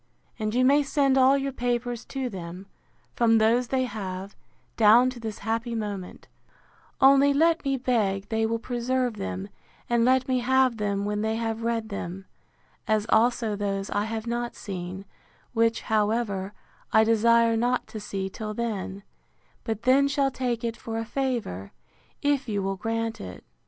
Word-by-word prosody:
and 215 +1 -2
you 255 +1 +4
may 285 +3 +5
send 275 -1 +2
all 265 +1 +5
your 275 0 -2
papers 245 -2 -2
to 265 -2 -3
them, 180 -3 -7 0.5
from 225 -1 +4
those 230 +3 +3
they 260 +1 +1
have, 195 -5 -5 0.4
down 230 +4 +6
to 250 - -10
this 220 -2 -5
happy 230 +1 -1
moment; 205 -4 -5 0.7
only 275 +1 +6
let 330 +2 +3
me 275 -1 0
beg 205 -6 0
they 225 0 0
will 225 +1 +1
preserve 245 0 -1
them, 95 - -4 0.4
and 235 -1 +2
let 255 +1 +3
me 255 -1 +1
have 260 -1 +2
them 200 -1 -1
when 210 0 -1
they 220 +1 0
have 225 0 -2
read 230 -1 -1
them; 195 -1 -6 0.6
as 215 -2 +2
also 225 -1 +2
those 200 -1 -3
I 205 - 0
have 220 0 -4
not 240 0 -3
seen; 185 0 -6 0.5
which, 230 0 +2
however, 210 -2 0 0.4
I 220 - +6
desire 230 +1 +4
not 245 +2 +1
to 220 - -6
see 195 -2 -4
till 215 +2 -6
then; 200 -4 -4 0.6
but 220 -2 -4
then 265 +3 +5
shall 280 -1 +1
take 245 -3 -2
it 230 -1 -2
for 225 0 -6
a 225 - -2
favour, 230 - -3 0.5
if 285 -4 +1
you 200 -2 -1
will 195 0 -1
grant 225 +2 -3
it. 90 -1 -9
225 Hz, 165 wpm, -26 LUFS, 205-250 Hz, 0.7 s, down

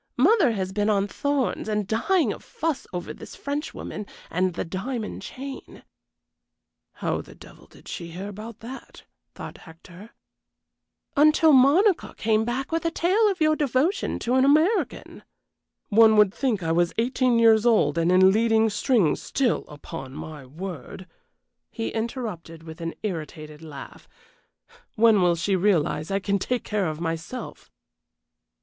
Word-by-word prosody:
Mother 315 - +4
has 190 -3 -3
been 205 +2 0
on 200 -1 +2
thorns 280 -1 -1
and 210 -1 0
dying 230 - +1
of - - -12
fuss 320 -3 -3
over 180 -1 -5
this - - -11
Frenchwoman 285 -7 -5 0.2
and 180 0 0
the - - -3
diamond 210 +6 -4
chain 270 +6 -9 1.1
("How - - -2
the - - -15
devil - - -16
did - - -18
she 170 - -6
hear 180 +4 -7
about 210 +2 -9
that?" 255 +4 -10 0.3
thought - - -9
Hector) 175 +5 -14 1.1
until 305 +1 +5
Monica 320 +9 +4
came 220 0 +1
back 255 +5 -3
with 330 0 -1
a 335 - +1
tale 385 +7 +2
of 380 -4 -3
your 310 0 +4
devotion 290 - 0
to 240 - -2
an 260 0 +4
American." 310 +10 +1 0.7
"One 220 0 +6
would 210 -2 +5
think 230 -9 -1
I 165 - 0
was 170 +1 +2
eighteen 250 +1 +2
years 225 -2 +5
old 215 -12 +3
and 165 +2 +2
in 190 +1 +6
leading 225 +1 +3
strings 205 - +1
still, 260 -4 0
upon 135 -2 -9
my 150 -4 -8
word," 185 +5 -8 0.6
he 225 - -4
interrupted, 220 - -5
with 160 0 -10
an 165 0 -4
irritated 155 -5 -6
laugh. 150 -4 -11 0.9
"When 220 -3 +5
will 175 -1 +3
she 190 +4 0
realize 170 -5 +1
I 195 - 0
can 200 0 -1
take 250 +5 -2
care 205 -4 -1
of 155 -1 -4
myself?" 165 +8 -5
215 Hz, 150 wpm, -25 LUFS, 175-260 Hz, 1.1 s, One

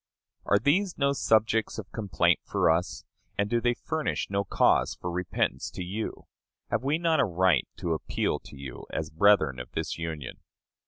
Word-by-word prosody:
Are 100 - +5
these 170 - +1
no 140 0 +2
subjects 110 -3 +2
of 110 -4 -7
complaint 105 -4 +1
for - - +2
us? 85 +2 -1 0.3
And 100 - +1
do 120 +2 +1
they 120 0 +2
furnish 155 -8 -2
no 100 0 +1
cause - - +2
for 90 - -5
repentance 90 +1 -1
to 90 - -6
you? 100 +5 -5 0.5
Have - - 0
we 145 +3 +1
not 165 -2 +2
a - - +5
right 90 - +2
to 85 -2 -1
appeal 80 - -1
to - - -13
you 65 -3 -8
as 80 -1 -4
brethren 80 -6 +4
of 60 - -8
this - - -3
Union? 80 -5 -5
100 Hz, 175 wpm, -28 LUFS, 80-120 Hz, 0.5 s, Are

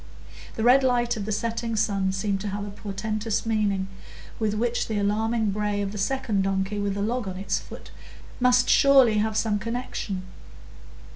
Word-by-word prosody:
The 220 - -2
red 250 +3 +6
light 240 -2 +2
of 210 -3 -4
the 215 - -3
setting 230 +2 -2
sun 200 -3 +1
seemed 195 0 -1
to 210 - -4
have 205 +1 -3
a 205 - -7
portentous 215 +2 -3
meaning, 205 -4 0 0.5
with 215 -2 0
which 240 +2 0
the 220 - -2
alarming 215 +2 +1
bray 210 0 -1
of 200 -1 -2
the 210 - -6
second 215 -2 0
donkey 195 +1 -1
with 200 -1 -1
the 200 - -1
log 235 0 -1
on 185 -1 -5
its 195 +1 -1
foot - - -12 0.5
must 250 0 +4
surely 265 -6 +5
have 215 0 0
some 215 -2 +1
connection. 230 -4 -4
210 Hz, 175 wpm, -25 LUFS, 200-230 Hz, 0.5 s, red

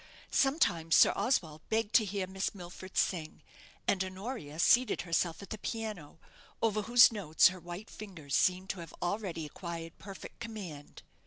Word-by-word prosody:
Sometimes 175 - +2
Sir - - +7
Oswald 160 - 0
begged 220 0 0
to 225 -2 +6
hear 200 -1 -2
Miss 190 +2 -3
Milford 185 +1 -9
sing, 160 -4 -1 0.4
and 190 -1 +2
Honoria 185 - -6
seated 235 +7 +4
herself 170 +1 -1
at - - -12
the 215 - -4
piano, 215 -11 -5 0.4
over 215 -2 +1
whose 240 +4 +7
notes 185 -8 +4
her 185 0 -8
white 175 +5 -8
fingers 170 -10 -9
seemed 185 +1 +2
to 190 - -8
have 165 -2 -9
already 175 -3 -2
acquired 165 +1 -7
perfect 195 -1 -10
command. 190 -11 -8
185 Hz, 155 wpm, -32 LUFS, 165-215 Hz, 0.4 s, Sir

